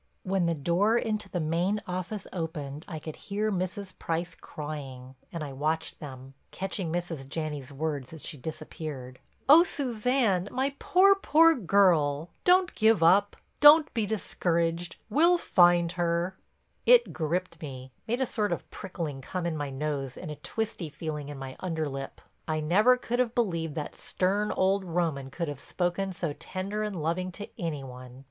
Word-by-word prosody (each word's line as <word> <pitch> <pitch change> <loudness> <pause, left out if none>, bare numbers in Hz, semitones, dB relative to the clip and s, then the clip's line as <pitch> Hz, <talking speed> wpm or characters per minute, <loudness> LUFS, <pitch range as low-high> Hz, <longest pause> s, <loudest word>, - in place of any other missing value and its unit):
When 185 -2 +1
the 170 - +1
door 175 +10 +2
into 215 -4 -2
the 180 - -2
main 170 +6 0
office 185 +3 -4
opened 155 -4 -5
I 160 - -5
could 155 0 -7
hear 210 +2 -2
Mrs. 185 +1 -3
Price 170 +1 -2
crying, 135 -4 -7 0.2
and 165 -2 -4
I 140 -2 -6
watched 155 +4 -1
them, 135 -2 -9 0.2
catching 190 -3 -3
Mrs. 165 -6 -4
Janney's 150 -3 -4
words 140 -2 -3
as 160 -2 -9
she 160 - -5
disappeared: 140 -3 -7 0.3
"Oh, 310 +5 +9
Suzanne, 240 - 0
my 270 +2 0
poor, 385 +2 +6
poor, 330 -4 +5
girl! 170 - +3
Don't 365 0 +4
give 220 -5 +4
up—don't 290 - +5
be 225 -3 0
discouraged—we'll 175 - +1
find 175 - +4
her!" 175 +1 0 0.5
It 485 -1 +6
gripped 170 +1 -2
me, 130 -3 -8 0.2
made 240 +4 0
a - - +3
sort 210 -3 -1
of - - -3
prickling 165 -8 -5
come 180 +5 -4
in 170 -2 -1
my 145 -2 -3
nose 135 -1 -3
and 155 - -6
a - - -5
twisty 220 -7 -3
feeling 150 -1 -5
in 145 - -7
my 135 -1 -7
under 160 -4 -2
lip. 135 -1 -6 0.3
I 155 -1 0
never 210 +11 +4
could 245 0 -2
have 245 -2 +1
believed 170 -9 0
that 150 -2 -4
stern 200 +3 0
old 190 +1 +2
Roman 165 -6 -1
could 170 +4 -3
have 145 -3 -5
spoken 180 +4 -2
so 170 -4 -2
tender 195 +6 -4
and 210 -4 -3
loving 170 +4 -1
to 205 +3 -7
any 155 -5 -3
one. 125 -1 -10
170 Hz, 165 wpm, -28 LUFS, 150-205 Hz, 0.5 s, Oh